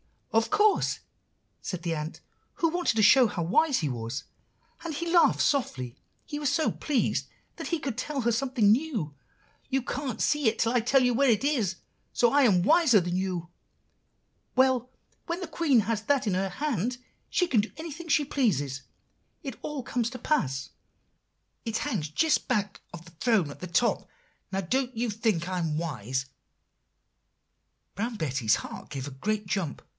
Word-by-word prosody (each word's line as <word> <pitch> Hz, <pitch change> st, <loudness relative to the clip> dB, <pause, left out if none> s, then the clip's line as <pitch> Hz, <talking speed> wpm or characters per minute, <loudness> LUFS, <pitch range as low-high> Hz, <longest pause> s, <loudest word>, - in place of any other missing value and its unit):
"'Of 225 Hz, 0 st, +3 dB
course,' 420 Hz, 0 st, +2 dB, 0.6 s
said 180 Hz, -2 st, -5 dB
the 170 Hz, -2 st, -1 dB
ant 155 Hz, 0 st, -5 dB, 0.3 s
who 330 Hz, -, +2 dB
wanted 350 Hz, -7 st, 0 dB
to 220 Hz, -, +3 dB
show 250 Hz, +4 st, +7 dB
how 180 Hz, -5 st, -3 dB
wise 270 Hz, -, +3 dB
he 150 Hz, -, -1 dB
was; 120 Hz, +1 st, -4 dB, 0.6 s
and 335 Hz, -2 st, -4 dB
he 335 Hz, +3 st, -3 dB
laughed 345 Hz, -, +5 dB
softly, 135 Hz, -, 0 dB, 0.3 s
he 295 Hz, -2 st, -5 dB
was 290 Hz, -2 st, +1 dB
so 315 Hz, -, +2 dB
pleased 285 Hz, -5 st, 0 dB, 0.3 s
that -, -, -5 dB
he 335 Hz, -, -1 dB
could 270 Hz, -6 st, -4 dB
tell 280 Hz, +1 st, -2 dB
her 235 Hz, 0 st, +2 dB
something 235 Hz, -3 st, +2 dB
new. 225 Hz, -, 0 dB, 0.6 s
'You 270 Hz, 0 st, +1 dB
can't 255 Hz, -2 st, -4 dB
see 295 Hz, -3 st, +2 dB
it 220 Hz, -, +2 dB
till 230 Hz, -, +2 dB
I 245 Hz, -, +3 dB
tell 255 Hz, +3 st, +3 dB
you 250 Hz, -1 st, +3 dB
where 270 Hz, +2 st, +3 dB
it 220 Hz, +1 st, +3 dB
is, 235 Hz, -11 st, +1 dB, 0.4 s
so 240 Hz, -1 st, +3 dB
I 285 Hz, 0 st, +5 dB
am 190 Hz, -8 st, +4 dB
wiser 300 Hz, -, +5 dB
than 175 Hz, +1 st, -2 dB
you. 180 Hz, -3 st, -2 dB, 1.1 s
Well, 255 Hz, -1 st, +3 dB, 0.4 s
when 340 Hz, +2 st, -3 dB
the 360 Hz, -, -4 dB
Queen 300 Hz, -6 st, +3 dB
has 220 Hz, 0 st, -1 dB
that 280 Hz, +1 st, +1 dB
in 205 Hz, -, 0 dB
her 190 Hz, +1 st, 0 dB
hand, 245 Hz, -, -2 dB, 0.3 s
she 365 Hz, -, +2 dB
can 260 Hz, -11 st, +2 dB
do 205 Hz, -, -1 dB
anything 325 Hz, +1 st, -7 dB
she 300 Hz, -2 st, +3 dB
pleases, 145 Hz, -, 0 dB, 0.6 s
it 270 Hz, -5 st, -6 dB
all 295 Hz, -4 st, -4 dB
comes 235 Hz, -1 st, -1 dB
to 255 Hz, -, -6 dB
pass. 135 Hz, -, -1 dB, 1.0 s
It 225 Hz, -1 st, -1 dB
hangs 155 Hz, -, -2 dB
just 305 Hz, -, +1 dB
back 210 Hz, -5 st, -1 dB
of 170 Hz, -1 st, -8 dB
the 170 Hz, -, -14 dB
throne, 210 Hz, -, +2 dB
at -, -, -12 dB
the 180 Hz, -, -6 dB
top. 180 Hz, +7 st, +1 dB, 0.4 s
Now, 195 Hz, 0 st, -1 dB
don't 255 Hz, +7 st, -1 dB
you 235 Hz, +1 st, 0 dB
think 205 Hz, -5 st, 0 dB
I 185 Hz, -1 st, -1 dB
am 160 Hz, -3 st, -1 dB
wise?' 130 Hz, -5 st, -2 dB, 1.7 s
"Brown 230 Hz, +4 st, -2 dB
Betty's 135 Hz, -, +1 dB
heart -, -, -8 dB
gave 135 Hz, -2 st, -5 dB
a -, -, -7 dB
great 210 Hz, +10 st, -2 dB
jump. 185 Hz, -6 st, -2 dB
230 Hz, 180 wpm, -28 LUFS, 175-280 Hz, 1.7 s, show